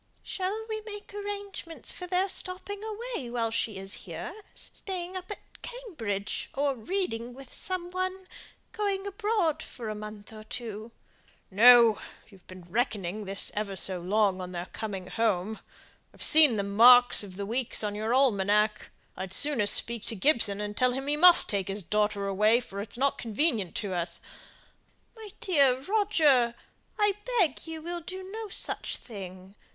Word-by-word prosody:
"Shall 400 +4 -3
we 435 -1 -4
make 415 -1 -10
arrangements 405 -4 -5
for 360 - -7
their 365 +2 +2
stopping 385 +2 -2
away 440 - -5
while 230 -2 -1
she 225 -2 -2
is 195 +1 -5
here; - - -6 0.2
staying 370 -1 -4
up 370 0 -6
at 415 - -10
Cambridge, 310 - -5
or 280 0 +1
reading 245 - -3
with 270 -1 -11
some 360 -1 -2
one? 370 +1 -3 0.4
going 405 -3 -2
abroad 400 -6 0
for 230 -3 -7
a - - -2
month 210 0 -9
or 215 0 -10
two?" 220 -1 -7 0.6
"No; 230 +1 +7 0.3
you've 195 -4 -19
been 185 -1 -11
reckoning 205 0 -2
this 195 +1 0
ever 205 -2 -3
so 190 -1 -1
long 195 0 +1
on 180 0 -7
their 175 0 -4
coming 205 -4 -5
home. 215 0 -1 0.6
I've - - -3
seen 305 -6 +6
the 200 - 0
marks 245 +5 +7
of 190 -3 -10
the 200 +1 -4
weeks 235 +2 -2
on 205 -1 -1
your 215 +2 -2
almanack. 210 -4 +2 0.3
I'd 190 0 -2
sooner 280 -8 +4
speak 235 +1 +2
to 225 - -2
Gibson, 215 -3 +2
and 210 0 -4
tell 250 +1 +2
him 270 +1 -3
he 290 +1 0
must 350 +3 +7
take 195 -3 -1
his 195 +1 -4
daughter 210 +1 0
away, 210 +4 +3
for 200 -5 -7
it's 215 - -6
not 275 +2 +1
convenient 225 - 0
to 200 -3 -3
us 175 0 -2 0.5
" - - -38
"My 440 -2 -10
dear 275 -8 +3
Roger! 295 - +3 0.4
I 415 -1 +3 0.3
beg 340 -3 +1
you 320 -1 -6
will 345 +1 -4
do 370 +3 -7
no 445 +1 -5
such 390 - -2
thing. 190 -4 -10
240 Hz, 165 wpm, -28 LUFS, -, 0.6 s, No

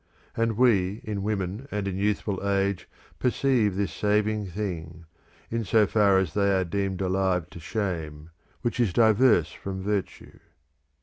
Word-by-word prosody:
And 115 -2 0
we 105 -5 +3
in 105 -2 -3
women 100 +4 -3
and 105 -1 -3
in 95 - -2
youthful 100 0 -1
age 100 -1 0 0.3
perceive 125 -5 +2
this 100 0 -1
saving 105 0 0
thing, 85 -4 -5 0.5
in 115 0 -1
so 110 +1 +4
far 100 -1 +3
as 95 -5 0
they 100 -1 +2
are 95 - +1
deemed 95 +1 -2
alive 95 -2 0
to - - -10
shame, 80 -5 -4 0.3
which 120 0 -2
is 110 -7 +2
diverse 110 -6 +4
from 95 -1 -6
virtue. 100 -1 -4
100 Hz, 145 wpm, -26 LUFS, 95-110 Hz, 0.5 s, so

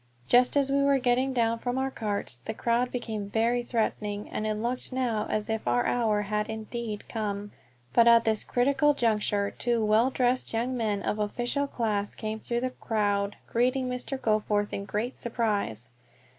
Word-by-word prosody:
Just 250 +3 +5
as 275 -1 +2
we 280 0 +3
were 280 0 +4
getting 255 +1 +2
down 230 -2 +1
from 245 +2 -2
our 265 0 0
carts 205 - -3
the 220 - -4
crowd 240 +2 +1
became 220 -5 -4
very 230 +3 +1
threatening, 215 -3 -2
and 215 - -2
it 215 - 0
looked 240 +5 -3
now 245 -5 -1
as 215 -1 -1
if 220 - -3
our 120 0 +2
hour 215 -4 +1
had 210 +1 -2
indeed 220 -1 -5
come; 205 -2 -3 0.4
but 235 0 +6
at 230 -1 +7
this 220 -1 +1
critical 280 +4 +2
juncture 210 -4 +1
two 235 -2 0
well 220 +4 +4
dressed 250 -1 0
young 240 +3 0
men 215 -4 -1
of 210 - -1
official 240 +7 -1
class 210 -6 -1
came 220 0 -4
through 235 +2 -2
the 255 0 -1
crowd, 205 -4 -1
greeting 255 +2 +1
Mr. 250 +2 -3
Goforth 210 -2 +1
in 200 - -3
great 215 +6 -3
surprise. 205 - -2
225 Hz, 175 wpm, -28 LUFS, 210-245 Hz, 0.4 s, at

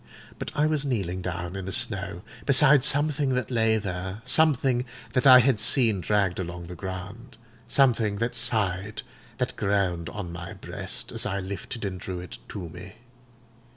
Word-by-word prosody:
But - - -4
I 150 - +2
was 155 -2 +1
kneeling 95 -9 -2
down 90 0 -4
in 95 -1 -5
the 95 - -4
snow, 100 -2 0 0.2
beside 140 -1 +6
something 145 -2 +3
that 125 +1 -2
lay 110 -2 +2
there—something 115 - +1 0.3
that 125 +2 +3
I 130 -1 +10
had 125 -3 +2
seen 110 -3 +3
dragged 100 -2 +1
along 85 -1 -5
the 90 +1 -8
ground—something 115 - -2
that 115 +4 -2
sighed, 100 -2 -1 0.3
that - - -2
groaned 95 -4 0
on 100 -5 -6
my 85 0 -7
breast, - - -5
as - - -2
I 100 - -2
lifted 100 +3 -6
and 95 -2 -4
drew 90 0 -5
it 90 -1 -9
to 95 -4 -6
me. 90 +4 -11
105 Hz, 155 wpm, -26 LUFS, 95-125 Hz, 0.3 s, I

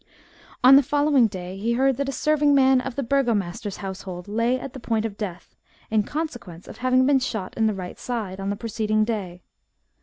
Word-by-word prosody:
On 265 +2 +9
the - - +7
following 285 -2 +3
day 185 -1 -7
he 230 +3 0
heard 265 +1 +2
that 280 -1 -2
a - - -1
serving 295 0 +2
man 265 -1 +5
of 265 -1 -6
the 280 - -2
burgomaster's 215 -7 -1
household 185 -1 -7
lay 230 +5 0
at 265 - -8
the 265 - -8
point 225 -2 -1
of 215 -3 -4
death, 190 -4 -7 0.4
in 220 -1 +3
consequence 240 - -6
of - - -10
having 255 +1 +3
been 275 0 +4
shot 220 -7 -4
in 220 -1 +2
the 215 - 0
right 180 -2 -7
side, 215 -6 -4
on 195 0 -3
the 200 - -1
preceding 215 -1 0
day. 190 -6 -4
230 Hz, 205 wpm, -24 LUFS, 200-265 Hz, 0.4 s, On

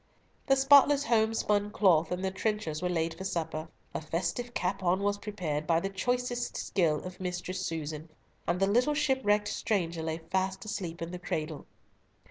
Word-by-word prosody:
The 270 - +5
spotless 280 +1 +6
home 225 -3 +2
spun 205 -1 +1
cloth 175 -6 +3
and 180 +1 -1
the 190 - 0
trenchers 190 -6 -2
were 180 - 0
laid 165 -1 0
for 175 +3 -8
supper, 160 -3 -3 0.3
a - - -3
festive 175 +10 -3
capon 185 0 0
was 205 0 +1
prepared 170 -8 -3
by 165 0 +4
the 195 - -2
choicest 245 +4 -1
skill 160 -5 +1
of 180 0 -8
Mistress 185 0 -3
Susan, 160 -2 -4 0.4
and 175 +1 +1
the 195 - +4
little 245 +9 +2
shipwrecked 265 -8 +2
stranger 170 -6 -1
lay 160 0 -2
fast 190 +4 -2
asleep 180 -6 -4
in 165 - -5
the 180 - -6
cradle. 155 -3 -4
185 Hz, 170 wpm, -30 LUFS, 165-210 Hz, 0.4 s, spotless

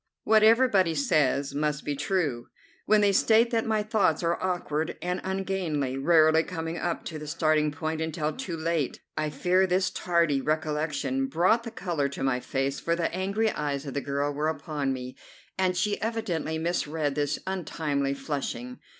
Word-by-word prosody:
What 220 0 +5
everybody 215 -7 +4
says 140 -1 +1
must 150 0 -1
be 145 - -1
true 145 -5 -1 0.4
when 215 0 +5
they 205 -1 +4
state 225 +4 +4
that 225 -1 0
my 215 -1 +1
thoughts 205 -7 +1
are 170 +1 0
awkward 170 -4 -2
and 180 +1 -2
ungainly, 185 -8 -2
rarely 160 +2 +5
coming 165 0 -4
up 175 -1 -2
to 160 -2 -5
the 150 - -8
starting 155 -1 +2
point 160 +1 -3
until 155 -1 -2
too 190 -11 -5
late. 160 -3 -1 0.2
I 155 0 -1
fear 180 +6 +2
this 185 +1 +1
tardy 170 -6 +1
recollection 150 -3 -1
brought 180 - +3
the - - -4
colour 175 -10 -2
to 140 - -5
my 135 -2 +1
face, 135 +2 -2
for 170 - 0
the 170 -1 -1
angry 200 +4 0
eyes 145 -1 -3
of 135 - -5
the 140 - -1
girl 140 +1 -1
were 150 +2 -1
upon 145 -2 -2
me, 130 -1 -6 0.4
and 185 -1 +1
she 205 +2 0
evidently 205 -9 -2
misread 160 -3 -1
this 145 0 0
untimely 150 -7 -2
flushing. 135 -3 -4
160 Hz, 170 wpm, -27 LUFS, 145-185 Hz, 0.4 s, What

